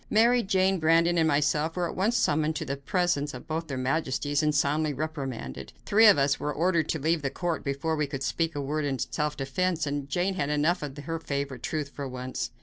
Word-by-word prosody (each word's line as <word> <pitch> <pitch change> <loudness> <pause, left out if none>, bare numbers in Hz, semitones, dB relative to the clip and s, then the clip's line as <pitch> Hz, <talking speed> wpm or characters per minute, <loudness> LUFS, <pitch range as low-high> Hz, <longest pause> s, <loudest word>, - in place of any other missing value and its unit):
Mary, 235 +3 +4
Jane, 190 -2 +2
Brandon 165 +2 +3
and 160 - +3
myself 150 +2 +1
were 180 -1 0
at - - -6
once 215 +6 +1
summoned 155 +1 +1
to - - -3
the 140 - -2
presence 145 -1 -1
of 125 - -9
both 160 +1 -3
their 135 - -4
majesties 140 +2 0
and 150 -1 +1
soundly 150 +1 +1
reprimanded. 130 - -5
Three 220 +2 +6
of 205 - +7
us 140 0 +2
were 150 - -2
ordered 165 0 +1
to 160 - 0
leave 160 +2 +1
the 140 - -1
court 170 +4 -3
before 140 +3 -1
we 150 -1 0
could 135 -1 -5
speak 165 +2 -1
a 145 - -2
word 150 +2 -2
in 140 -2 -1
self 150 +4 -2
defense, 160 +5 -1
and 140 -1 -3
Jane 180 +6 0
had 145 -6 -2
enough 150 +5 +1
of 145 -1 -6
her 165 +3 -4
favorite 140 -5 -4
truth 150 -3 -3
for 140 0 -6
once. 130 0 -4
150 Hz, 225 wpm, -27 LUFS, 140-165 Hz, -, of